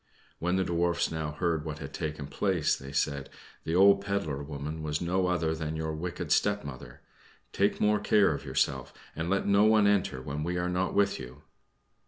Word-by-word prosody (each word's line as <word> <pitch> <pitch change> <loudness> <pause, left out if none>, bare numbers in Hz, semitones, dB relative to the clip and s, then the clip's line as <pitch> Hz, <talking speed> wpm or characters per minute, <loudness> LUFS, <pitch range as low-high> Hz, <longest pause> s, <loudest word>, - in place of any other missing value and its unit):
When 90 +2 0
the 95 - +2
Dwarfs 85 -1 0
now 80 -2 -3
heard 80 -1 -1
what 75 -1 -5
had - - -8
taken 75 -2 -4
place, 90 +2 0
they 70 +1 -9
said, 70 -1 -1 0.4
"The 80 - -1
old 100 +1 +6
pedler 100 -8 -2
woman 75 +2 -5
was 75 0 -2
no 90 +2 0
other 85 -3 0
than 80 -1 -4
your 80 0 -3
wicked 85 +3 -5
stepmother. 100 -11 -1 0.5
Take 100 +1 +1
more 105 0 +3
care 105 -2 +3
of - - -6
yourself, 65 -3 -1 0.2
and 80 +2 -3
let 100 +1 +1
no 100 +1 +4
one 110 -1 +5
enter 100 -10 +2
when 70 +3 -4
we 90 +2 -2
are 90 0 -1
not 90 +1 -1
with 100 0 +2
you." 65 +3 -10
85 Hz, 190 wpm, -29 LUFS, 75-95 Hz, 0.5 s, old